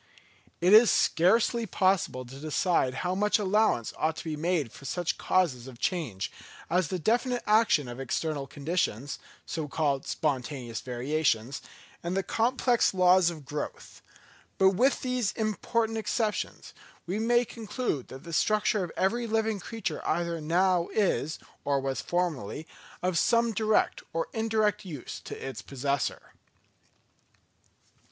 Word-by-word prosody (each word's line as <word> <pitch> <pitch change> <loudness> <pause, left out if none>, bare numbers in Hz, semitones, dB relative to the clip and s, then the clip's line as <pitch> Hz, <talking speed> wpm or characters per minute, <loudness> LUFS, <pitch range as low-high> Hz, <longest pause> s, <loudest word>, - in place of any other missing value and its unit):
It 180 +3 +5
is 220 0 +9
scarcely 225 +6 +3
possible 185 -11 +1
to 135 +3 -10
decide 155 -3 +1
how 180 - +1
much 210 +3 +2
allowance 210 - +1
ought 155 +1 +1
to - - -7
be 160 -2 -3
made 155 -5 0
for - - -13
such 175 +5 -2
causes 140 -10 +1
of 130 -3 -10
change, 130 - -2 0.4
as 180 -1 +2
the 185 - -2
definite 240 - +1
action 210 - +4
of 120 +1 -7
external 140 +2 -2
conditions, 145 - -2 0.3
so 160 -3 -4
called 140 -1 0
spontaneous 130 -6 -2
variations, 130 0 -1 0.4
and 175 +2 -2
the 195 - +1
complex 240 0 +2
laws 180 -1 +5
of 155 -5 -8
growth; 145 +2 -6 0.6
but 190 - +6
with 250 +8 +2
these 250 -5 0
important 225 +1 -1
exceptions, 220 -1 -2 0.3
we 190 +5 -2
may 240 +2 +3
conclude 220 - -3
that 130 - -10
the 170 - -8
structure 210 +4 +2
of 175 - -5
every 235 +5 +1
living 220 -1 0
creature 190 -5 -4
either 170 0 -1
now 175 +2 +2
is, 185 -7 +1 0.3
or 140 -1 +1
was 135 0 -2
formerly, 160 - -2 0.4
of 180 -3 +2
some 235 +3 +3
direct 220 0 +1
or 165 0 -1
indirect 220 -2 +1
use 155 -9 -7
to - - -8
its 130 -5 -6
possessor. 140 +3 -2
175 Hz, 140 wpm, -28 LUFS, 145-215 Hz, 0.6 s, is